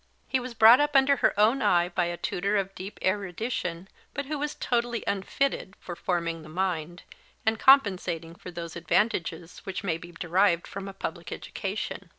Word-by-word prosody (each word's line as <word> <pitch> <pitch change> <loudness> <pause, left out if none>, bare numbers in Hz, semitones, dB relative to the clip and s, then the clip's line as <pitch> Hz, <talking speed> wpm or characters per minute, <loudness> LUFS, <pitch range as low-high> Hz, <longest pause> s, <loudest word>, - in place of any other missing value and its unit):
He 265 - +1
was 250 -1 -7
brought 225 +3 +8
up 295 -1 +1
under 275 +1 +5
her 205 - +2
own 230 +6 +4
eye 175 -5 +3
by 175 0 0
a 175 0 -3
tutor 200 +5 -1
of 195 -1 -2
deep 195 +2 -8
erudition, 185 -2 -2 0.3
but 280 +2 -2
who 295 +1 -3
was 295 +1 -2
totally 240 -1 -1
unfitted 200 +2 -1
for 175 - -7
forming 170 -2 -2
the 155 - -12
mind, 175 -1 -2 0.4
and 220 0 +1
compensating 185 - +4
for 180 - -10
those 170 -1 -7
advantages 170 -1 -1
which 195 0 -6
may 165 -4 -1
be 175 +1 -11
derived 175 +1 +2
from 195 0 -7
a 195 - -7
public - - -6
education. - - -5
190 Hz, 175 wpm, -27 LUFS, 175-235 Hz, 0.4 s, brought